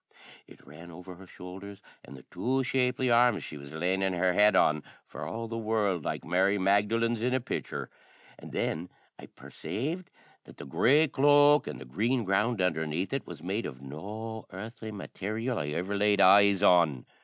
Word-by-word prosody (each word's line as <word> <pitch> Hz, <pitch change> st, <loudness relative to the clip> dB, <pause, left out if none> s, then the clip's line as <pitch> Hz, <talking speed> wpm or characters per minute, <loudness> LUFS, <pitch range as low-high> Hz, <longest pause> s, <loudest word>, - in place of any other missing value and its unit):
It -, -, -18 dB
ran 75 Hz, +5 st, -13 dB
over 90 Hz, +2 st, -10 dB
her 95 Hz, +2 st, -14 dB
showldhers 95 Hz, +3 st, -10 dB, 0.2 s
and 70 Hz, -, -12 dB
the 65 Hz, -, -14 dB
two 130 Hz, +2 st, -1 dB
shapely 125 Hz, -1 st, 0 dB
arms 120 Hz, -2 st, +4 dB
she -, -, -8 dB
was 70 Hz, -1 st, -10 dB
lanin' 95 Hz, +4 st, -1 dB
her 90 Hz, +1 st, +1 dB
head 105 Hz, +1 st, +4 dB
on, 75 Hz, -3 st, +3 dB, 0.2 s
for -, -, -8 dB
all 115 Hz, +1 st, -5 dB
the 115 Hz, 0 st, -5 dB
world 105 Hz, -6 st, 0 dB
like -, -, -4 dB
Mary 95 Hz, +4 st, +2 dB
Magdalen's 105 Hz, +4 st, +1 dB
in 125 Hz, +2 st, +1 dB
a -, -, +1 dB
picther; 120 Hz, -, -5 dB, 0.5 s
and -, -, -11 dB
then 85 Hz, +3 st, -2 dB, 0.3 s
I -, -, -11 dB
persaved 165 Hz, -, -6 dB, 0.4 s
that -, -, -15 dB
the -, -, -9 dB
grey 140 Hz, -, +3 dB
cloak 145 Hz, +1 st, +4 dB
and 60 Hz, -, -6 dB
the 65 Hz, -, -10 dB
green 110 Hz, -, -1 dB
gownd 105 Hz, +5 st, +1 dB
undhernaith 80 Hz, -, -1 dB
it 135 Hz, -, -3 dB
was 80 Hz, -3 st, -10 dB
made 100 Hz, +6 st, -2 dB
of 65 Hz, -1 st, -10 dB
no 105 Hz, +10 st, -7 dB
earthly 110 Hz, +3 st, -8 dB
matarial 110 Hz, +4 st, -4 dB
I 75 Hz, -, -3 dB
ever 90 Hz, +7 st, -3 dB
laid 100 Hz, 0 st, +2 dB
eyes 100 Hz, 0 st, +6 dB
on. 80 Hz, -8 st, +4 dB
100 Hz, 180 wpm, -29 LUFS, 90-115 Hz, 0.5 s, eyes